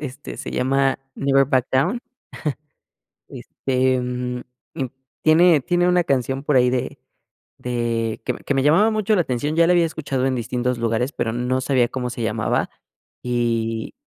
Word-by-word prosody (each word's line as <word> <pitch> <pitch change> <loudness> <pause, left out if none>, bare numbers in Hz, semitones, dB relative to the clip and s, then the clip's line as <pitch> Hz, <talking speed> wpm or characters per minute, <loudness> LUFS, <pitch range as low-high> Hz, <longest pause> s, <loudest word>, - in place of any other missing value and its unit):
este, 145 0 -7
se - - -6
llama 135 +1 +1 0.2
Never 135 0 +3
Back 130 -2 +1
Down. 175 - +1 1.3
Este, 130 -1 -1
mm, 125 0 -3 0.4
im 135 -5 -2 0.3
tiene 160 0 +5
tiene 175 +5 +1
una 180 -1 +3
canción 135 -1 0
por 145 -2 +1
ahí 125 0 +5
de 125 -1 -2 0.6
de 115 -2 -2
que - - 0
me - - -10
que 145 - -1
me 135 - +2
llamaba 175 +10 +4
mucho 215 0 +1
la 180 - +3
atención. 145 +1 -2
Ya 170 - +5
la 180 - +4
había 170 -2 +4
escuchado 140 -5 -2
en 130 - 0
distintos 125 +1 -1
lugares, 115 +3 0
pero 115 - -2
no 125 +2 -1
sabía 130 -3 +2
cómo 125 -1 -4
se 120 - -6
llamaba 110 - 0 0.5
y 115 -2 -1
130 Hz, 165 wpm, -22 LUFS, 125-150 Hz, 1.3 s, tiene